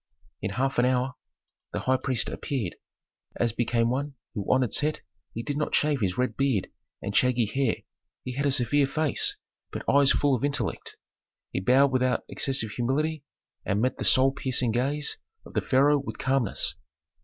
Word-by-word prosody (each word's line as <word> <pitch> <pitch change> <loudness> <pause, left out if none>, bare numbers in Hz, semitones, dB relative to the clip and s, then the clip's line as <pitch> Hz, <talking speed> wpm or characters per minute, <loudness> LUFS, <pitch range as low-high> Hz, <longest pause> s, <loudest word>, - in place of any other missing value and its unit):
In - - -2
half 135 +3 0
an 120 - +4
hour 125 0 +1 0.6
the - - -2
high 130 0 +2
priest 130 -3 0
appeared. 120 -11 -3 0.6
As 120 -1 +1
became 115 0 +1
one 140 +2 -2 0.2
who 105 -4 -2
honored 130 -2 +2
Set 150 +1 0 0.3
he 115 - -5
did 145 +2 -3
not 150 - 0
shave 145 -3 +2
his 95 -2 0
red 125 0 0
beard 135 -8 0 0.3
and 100 - -4
shaggy 125 -2 +3
hair; 125 +2 -1 0.4
he 125 - -5
had 140 +3 0
a - - +2
severe 135 +2 +3
face, 155 +1 +1 0.3
but - - -6
eyes 140 0 +5
full 145 -1 +2
of 125 - 0
intellect. 140 -6 -2 0.6
He - - 0
bowed 130 +7 +4
without 130 -1 +1
excessive 130 -6 -1
humility 145 +6 -1 0.4
and 100 - 0
met 130 +3 0
the - - -2
soul 130 +1 +4
piercing 130 -3 0
gaze 140 +6 -1 0.3
of - - -13
the - - +1
pharaoh 145 +3 +3
with 140 - -6
calmness. 135 -5 0
130 Hz, 175 wpm, -27 LUFS, 120-140 Hz, 0.6 s, eyes